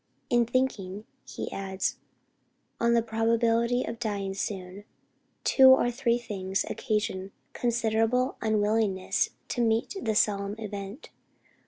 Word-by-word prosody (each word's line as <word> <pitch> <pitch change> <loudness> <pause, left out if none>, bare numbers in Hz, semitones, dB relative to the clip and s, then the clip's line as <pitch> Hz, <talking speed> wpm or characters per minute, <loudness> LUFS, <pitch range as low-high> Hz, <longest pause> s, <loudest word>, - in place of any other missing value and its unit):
"In 240 -1 +3
thinking," 220 -6 -1 0.2
he - - -6
adds, 190 -1 -2 0.8
"on 235 0 +3
the 230 - +3
probability 230 +2 +1
of 230 0 -6
dying 200 -4 -2
soon, 195 0 -5 0.6
two 265 -1 +7
or 260 -2 +5
three 240 -1 +1
things 195 -5 -3
occasion 195 -3 -2 0.2
considerable 235 +2 +1
unwillingness 210 -3 +1 0.2
to 245 - -1
meet 225 - +1
the 220 -2 -1
solemn 200 -1 +1
event. 205 +3 -7
220 Hz, 115 wpm, -28 LUFS, 200-235 Hz, 0.8 s, two